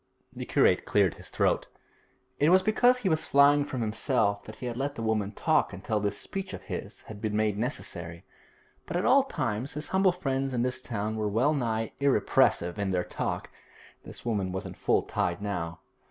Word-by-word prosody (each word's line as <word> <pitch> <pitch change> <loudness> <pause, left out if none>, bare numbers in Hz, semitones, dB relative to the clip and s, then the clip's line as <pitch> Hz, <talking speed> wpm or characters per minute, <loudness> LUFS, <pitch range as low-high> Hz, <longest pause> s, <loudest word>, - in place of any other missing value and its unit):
The - - -6
curate - - +3
cleared - - +2
his - - -13
throat. - - +1 0.7
It 150 - +4
was 185 +1 +6
because 245 +4 +4
he 250 - -2
was 160 -3 +1
flying 145 +1 +5
from 140 -4 -4
himself 105 -2 0
that 110 - -9
he - - -8
had 120 -1 -3
let 140 +3 -2
the 115 - -5
woman 110 -2 0
talk - - +1
until 105 +4 -2
this 100 0 -2
speech 195 0 -5
of - - -11
his - - -6
had 105 -2 -11
been 110 -1 -2
made 105 -1 +1
necessary; 90 - -5 0.6
but 175 - -2
at 180 - -1
all 270 +3 +6
times 125 - -3
his 150 +1 -5
humble 190 0 +4
friends 135 -6 -2
in 120 -1 +1
this 125 0 -2
town 110 -1 -3
were 105 -1 -1
well 125 +9 +2
nigh 115 -5 -1
irrepressible 105 -8 +2
in 100 - 0
their 90 -1 0
talk. - - -4 0.5
This - - -10
woman 100 -5 -1
was 95 0 -4
in - - -6
full - - +1
tide 85 0 -1
now. 90 -5 -4
115 Hz, 200 wpm, -28 LUFS, 100-145 Hz, 0.7 s, was